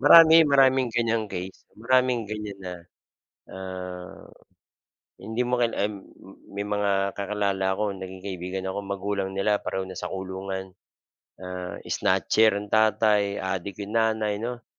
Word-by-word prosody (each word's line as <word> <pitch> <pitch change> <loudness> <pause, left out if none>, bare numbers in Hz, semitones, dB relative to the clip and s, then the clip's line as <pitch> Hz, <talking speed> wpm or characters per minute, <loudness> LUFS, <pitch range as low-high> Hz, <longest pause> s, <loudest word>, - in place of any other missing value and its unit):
Marami, 165 -1 +9
maraming 135 -2 +4
ganyang 115 -2 +1
case. 95 -1 -7
Maraming 125 +1 +2
ganyan 105 -1 -5
na, 90 -1 -5 0.7
ah, 90 -1 -8 0.9
hindi 110 +4 -3
mo 125 0 +1
kil 120 -2 +1
uhm, 105 0 -1 0.6
may 100 - -3
mga 100 -1 0
kakilala 100 -1 -1
ako 100 0 -2
naging 95 0 -8
kaibigan 95 -1 -4
ako, 100 +1 -4
magulang 100 0 -2
nila 105 +2 +2
pareho 95 - -3
nasa 95 - -6
kulungan. 95 0 -5 0.7
Ah, 90 -1 -6
snatcher 110 -2 +3
ang 100 0 -6
tatay, 105 -2 +3
adik 95 0 -3
'yong 100 - -9
nanay 110 -2 +1
'no. 120 +1 -5
100 Hz, 130 wpm, -26 LUFS, 95-110 Hz, 0.9 s, Marami